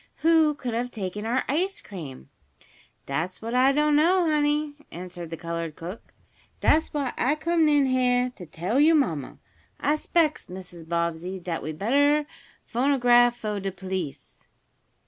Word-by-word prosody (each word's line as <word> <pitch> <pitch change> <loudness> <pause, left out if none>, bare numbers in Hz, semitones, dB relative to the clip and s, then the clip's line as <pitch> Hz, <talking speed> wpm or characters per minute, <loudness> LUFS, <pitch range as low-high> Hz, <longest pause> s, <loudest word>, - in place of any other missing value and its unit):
"Who 320 -2 +4
could 250 -4 -4
have 240 +2 -1
taken 210 -1 -5
our 250 +3 +1
ice 375 +8 0
cream?" 150 - -9 0.8
"Dat's 160 +7 -3
what 230 +2 -5
I 255 +2 +5
don't 300 +1 +2
know, 345 +4 +4
honey," 300 -1 +1 0.2
answered 175 -1 -8
the 165 - -6
colored 165 -1 -4
cook. 180 +6 -9 0.5
"Dat's 315 +1 +3
why 280 -4 -2
I 270 +5 +2
comed 320 0 +2
in 290 -2 +4
heah 250 -1 +2
to 180 - -10
tell 180 - -1
yo' 320 +3 +6
mamma. 160 - -1 0.4
I 300 +1 +1
'spects, 315 0 0
Mrs. 180 -3 -10
Bobbsey, 170 +2 -2
dat 170 -2 -4
we'd 155 +1 -5
better 285 - +3 0.4
phonograph 245 -2 +3
fo' 210 -3 -3
de 195 0 -3
police." 185 -5 -6
245 Hz, 150 wpm, -26 LUFS, 180-295 Hz, 0.8 s, yo